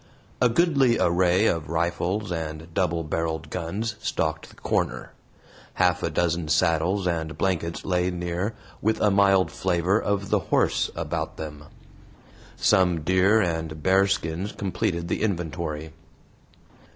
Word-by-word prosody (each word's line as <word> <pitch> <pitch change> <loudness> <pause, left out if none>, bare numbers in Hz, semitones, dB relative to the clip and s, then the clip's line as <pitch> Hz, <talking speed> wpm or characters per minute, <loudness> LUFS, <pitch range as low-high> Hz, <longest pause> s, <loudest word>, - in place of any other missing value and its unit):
A 125 - +5
goodly 140 -4 +3
array 90 +3 +3
of 80 -7 0
rifles 85 +4 -1
and 80 0 -5
double 85 -3 0
barreled 80 -1 -3
guns 100 +6 -3
stocked 80 -7 -2
the - - -17
corner; - - -2 0.6
half - - +2
a - - 0
dozen 85 -1 0
saddles 85 +5 +2
and 80 -3 -2
blankets 85 -4 -1
lay 90 -1 +1
near, 90 +4 -3 0.3
with 110 +1 +1
a 105 - +3
mild 95 -1 +4
flavor 90 +3 +1
of 100 -1 -2
the - - +4
horse - - +1
about - - -3
them. 75 -1 -7 0.9
Some 90 -3 +3
deer 95 +6 +3
and 80 -4 -3
bear 95 +1 +4
skins 90 +1 -2
completed 90 -3 -2
the - - -2
inventory. 85 -5 -3
90 Hz, 130 wpm, -25 LUFS, 80-95 Hz, 0.9 s, A